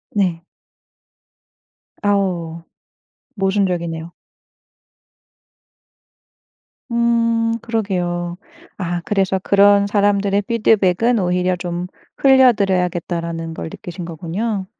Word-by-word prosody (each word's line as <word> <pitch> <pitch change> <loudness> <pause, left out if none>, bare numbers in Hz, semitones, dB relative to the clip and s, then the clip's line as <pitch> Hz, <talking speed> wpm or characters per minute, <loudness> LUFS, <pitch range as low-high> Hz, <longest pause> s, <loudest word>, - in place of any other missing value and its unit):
네. 180 -5 +1 1.6
아우. 180 -5 -1 0.7
모순적이네요. 180 -4 -1 2.8
음. 230 -1 +1
그러게요. 180 -6 -2 0.4
아 175 -2 -3
그래서 195 -2 +1
그런 200 0 +5
사람들의 200 -1 +2
피드백은 225 0 +2
오히려 180 0 +1
좀 175 0 -4 0.3
흘려들어야겠다라는 180 -10 +2
걸 - - -6
느끼신 175 +2 -8
거군요. 190 +5 -3
190 Hz, 195 characters per minute, -19 LUFS, 175-210 Hz, 2.8 s, 그런